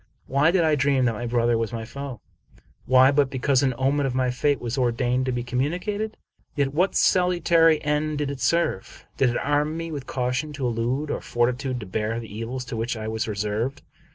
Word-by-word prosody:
Why 140 Hz, +4 st, +3 dB
did 175 Hz, 0 st, +3 dB
I 155 Hz, -1 st, +3 dB
dream 135 Hz, -2 st, +2 dB
that 115 Hz, -, +2 dB
my 120 Hz, +3 st, -4 dB
brother 120 Hz, -1 st, +2 dB
was 115 Hz, -1 st, -2 dB
my 115 Hz, -1 st, -5 dB
foe? 140 Hz, -1 st, -7 dB, 0.7 s
Why 130 Hz, +1 st, +6 dB
but 140 Hz, -1 st, +2 dB
because 130 Hz, 0 st, +1 dB
an 130 Hz, -3 st, +1 dB
omen 135 Hz, +2 st, +1 dB
of 130 Hz, -, -3 dB
my 130 Hz, -1 st, +1 dB
fate 140 Hz, +2 st, +1 dB
was 120 Hz, +1 st, -3 dB
or 125 Hz, -3 st, +2 dB
dained 125 Hz, +2 st, 0 dB
to -, -, +1 dB
be 120 Hz, -1 st, -2 dB
communicated? 180 Hz, -, -2 dB, 0.4 s
Yet 140 Hz, -2 st, 0 dB
what 180 Hz, +6 st, +1 dB
salutary 170 Hz, -3 st, +4 dB
end 150 Hz, +1 st, 0 dB
did 145 Hz, -1 st, -1 dB
it 140 Hz, -, -7 dB
serve? 170 Hz, -, -1 dB
Did 135 Hz, -, +3 dB
it 120 Hz, -, -1 dB
arm 150 Hz, +2 st, 0 dB
me 165 Hz, 0 st, -5 dB
with 140 Hz, -3 st, -6 dB
caution 125 Hz, +4 st, -2 dB
to 140 Hz, -3 st, -3 dB
elude 125 Hz, +5 st, -1 dB
or -, -, -3 dB
fortitude 125 Hz, +2 st, -1 dB
to -, -, -6 dB
bear 110 Hz, +4 st, -2 dB
the 110 Hz, -3 st, -9 dB
evils 125 Hz, +3 st, -4 dB
to 115 Hz, -, -6 dB
which 115 Hz, +1 st, -2 dB
I 110 Hz, 0 st, -5 dB
was 110 Hz, +2 st, -2 dB
reserved? 110 Hz, +6 st, -2 dB
130 Hz, 210 wpm, -24 LUFS, 120-145 Hz, 0.7 s, Why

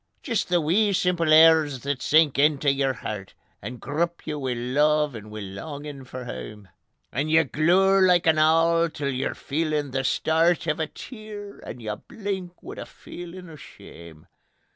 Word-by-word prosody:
Jist 230 Hz, -9 st, -1 dB
the 175 Hz, -1 st, +3 dB
wee 195 Hz, +7 st, +2 dB
simple 175 Hz, -3 st, +1 dB
airs 155 Hz, -4 st, +6 dB
that 140 Hz, -2 st, -3 dB
sink 155 Hz, -2 st, +4 dB
intae 145 Hz, -1 st, +3 dB
your 135 Hz, -1 st, +1 dB
hert, 105 Hz, -5 st, -7 dB, 0.3 s
And 120 Hz, +4 st, -7 dB
grup 170 Hz, +5 st, -3 dB
ye -, -, -3 dB
wi' 135 Hz, -4 st, -2 dB
love 150 Hz, +4 st, +1 dB
and 110 Hz, -2 st, -9 dB
wi' 105 Hz, 0 st, -7 dB
longin' 140 Hz, +8 st, -8 dB
for 130 Hz, 0 st, -8 dB
hame; 105 Hz, -4 st, -8 dB, 0.4 s
And 145 Hz, +4 st, -2 dB
ye 160 Hz, +1 st, +5 dB
glour 185 Hz, +7 st, +3 dB
like 180 Hz, -2 st, +4 dB
an 160 Hz, -1 st, +4 dB
owl 165 Hz, +2 st, +3 dB
till 145 Hz, -2 st, -3 dB
you're 130 Hz, 0 st, -2 dB
feelin' 150 Hz, -1 st, -2 dB
the 135 Hz, +1 st, -1 dB
stert 165 Hz, +5 st, +1 dB
O' -, -, -5 dB
a 155 Hz, -, -1 dB
tear, 210 Hz, -, -10 dB
and -, -, -9 dB
you 105 Hz, -1 st, -3 dB
blink 190 Hz, -4 st, -6 dB
wi' -, -, -8 dB
a -, -, -6 dB
feelin' 175 Hz, +1 st, -10 dB
o' 160 Hz, -, -11 dB
shame. 85 Hz, -, -14 dB
155 Hz, 170 wpm, -25 LUFS, 135-170 Hz, 0.4 s, airs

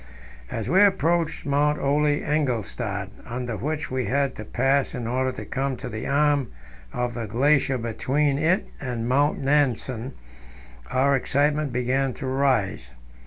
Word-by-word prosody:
As 115 Hz, -, -4 dB
we 185 Hz, +4 st, +4 dB
approached 170 Hz, -4 st, +2 dB
Mount 145 Hz, +1 st, +2 dB
Ole 145 Hz, +2 st, +2 dB
Engelstad, 120 Hz, -9 st, -1 dB
under 120 Hz, -1 st, -4 dB
which 150 Hz, +4 st, -3 dB
we 130 Hz, -1 st, -1 dB
had 140 Hz, +1 st, +1 dB
to 110 Hz, -, -7 dB
pass 135 Hz, +5 st, +1 dB
in 125 Hz, -2 st, -4 dB
order 130 Hz, +2 st, 0 dB
to -, -, -7 dB
come 135 Hz, 0 st, -2 dB
into 125 Hz, 0 st, -6 dB
the 110 Hz, -1 st, -5 dB
arm 145 Hz, -2 st, +2 dB, 0.4 s
of 120 Hz, -, -2 dB
the 115 Hz, -2 st, -4 dB
glacier 135 Hz, +4 st, +2 dB
between 135 Hz, +5 st, 0 dB
it 170 Hz, +6 st, +2 dB
and 120 Hz, -4 st, -3 dB
Mount 145 Hz, +4 st, +2 dB
Nansen, 135 Hz, -3 st, 0 dB, 0.8 s
our 140 Hz, +2 st, +3 dB
excitement 145 Hz, +2 st, +1 dB
began 130 Hz, +2 st, 0 dB
to 140 Hz, -, -6 dB
rise. 130 Hz, -, 0 dB
135 Hz, 145 wpm, -24 LUFS, 125-145 Hz, 0.8 s, we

